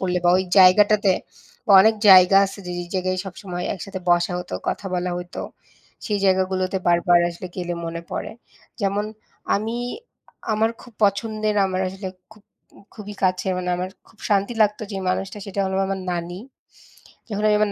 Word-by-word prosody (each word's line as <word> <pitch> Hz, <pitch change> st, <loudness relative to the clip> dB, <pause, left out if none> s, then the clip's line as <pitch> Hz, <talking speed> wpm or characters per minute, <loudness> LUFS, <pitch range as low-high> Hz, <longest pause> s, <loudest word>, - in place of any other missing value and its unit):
পড়লে 180 Hz, -1 st, 0 dB
বা 175 Hz, -, +5 dB
ওই 190 Hz, -, 0 dB
জায়গাটাতে 200 Hz, +2 st, +6 dB, 0.5 s
বা -, -, -2 dB
অনেক 220 Hz, +1 st, +4 dB, 0.2 s
জায়গা 185 Hz, 0 st, +8 dB
আছে 195 Hz, -, -9 dB
যে, -, -, -5 dB
যে -, -, -5 dB
জায়গায় 185 Hz, 0 st, -1 dB
সবসময় 180 Hz, -1 st, -6 dB
একসাথে 190 Hz, 0 st, -7 dB
বসা 175 Hz, +1 st, +3 dB
হতো 180 Hz, -, -6 dB
কথা 200 Hz, -, -3 dB
বলা 180 Hz, 0 st, -1 dB
হইতো, 180 Hz, 0 st, -6 dB, 0.6 s
সেই 210 Hz, -2 st, 0 dB
জায়গাগুলোতে 185 Hz, 0 st, +1 dB
বারবার 175 Hz, 0 st, +4 dB
আসলে 170 Hz, +2 st, -8 dB
গেলে 175 Hz, -1 st, -3 dB
মনে 165 Hz, 0 st, -5 dB
পড়ে। -, -, -4 dB, 0.5 s
যেমন 200 Hz, +1 st, 0 dB, 0.5 s
আমি 220 Hz, +3 st, -3 dB, 0.8 s
আমার 220 Hz, +1 st, +2 dB
খুব 245 Hz, -, -15 dB
পছন্দের 215 Hz, +1 st, 0 dB
আমার 185 Hz, -1 st, -2 dB
আসলে 190 Hz, +1 st, -6 dB, 0.2 s
খুব 215 Hz, -1 st, -20 dB, 0.5 s
খুবই 210 Hz, -1 st, -9 dB
কাছে 185 Hz, +1 st, 0 dB
মানে 180 Hz, 0 st, -4 dB
আমার 180 Hz, +1 st, -3 dB, 0.2 s
খুব 215 Hz, -, -24 dB
শান্তি 200 Hz, +3 st, +1 dB
লাগতো 210 Hz, +1 st, 0 dB
যে -, -, -4 dB
মানুষটা 195 Hz, +2 st, -3 dB
সেটা 200 Hz, 0 st, -3 dB
হলো 190 Hz, 0 st, -2 dB
আমার 195 Hz, -1 st, -3 dB
নানি, 175 Hz, +1 st, -4 dB, 0.9 s
যখন 210 Hz, -1 st, -3 dB
আমি 210 Hz, -, +4 dB
আমার 210 Hz, -1 st, +2 dB
190 Hz, 165 wpm, -22 LUFS, 180-205 Hz, 0.9 s, জায়গা